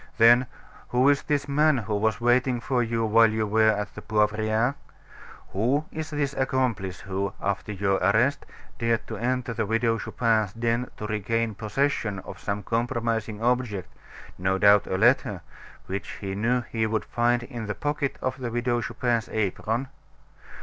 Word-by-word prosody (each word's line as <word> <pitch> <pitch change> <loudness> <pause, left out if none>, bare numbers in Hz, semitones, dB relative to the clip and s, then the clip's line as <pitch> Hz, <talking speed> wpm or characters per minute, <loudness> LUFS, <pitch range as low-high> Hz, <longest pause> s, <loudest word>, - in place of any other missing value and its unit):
"Then, 120 +2 +6 0.4
who 125 +3 +3
is 140 -1 +3
this 145 -1 -1
man 150 +1 +3
who 110 -3 -3
was 110 +3 +1
waiting 120 +1 +2
for 125 +1 0
you 115 -1 0
while 115 +1 +5
you 110 0 -1
were 110 +1 +3
at 105 -1 -1
the 105 - -8
Poivriere? 110 +3 +1 0.8
Who 125 +10 0
is 155 -1 -5
this 145 -2 -1
accomplice 125 -9 -1
who, 100 0 -3
after 100 +2 -2
your 95 -1 +1
arrest, 110 +10 +2 0.3
dared 115 -1 0
to 110 - -6
enter 125 +1 -1
the 115 -2 -2
Widow 115 +1 +1
Chupin's 110 -4 0
den 115 +2 -1
to 105 - -5
regain 110 +2 -1
possession 110 0 -1
of 95 - -9
some 105 0 -3
compromising 115 -2 -2
object 120 -6 0 0.5
no 95 +1 +1
doubt 100 +1 +5
a 95 - -1
letter 110 -4 +3 0.4
which 95 +1 -5
he 95 -1 -4
knew 120 +5 +1
he 115 -2 -2
would 110 -1 -1
find 120 0 +1
in 120 -3 -6
the 105 - -3
pocket 145 -1 -2
of 130 +1 -2
the 125 -2 -3
Widow 120 +1 0
Chupin's 120 -1 -1
apron? 110 +4 -1
115 Hz, 165 wpm, -26 LUFS, 105-125 Hz, 0.8 s, Then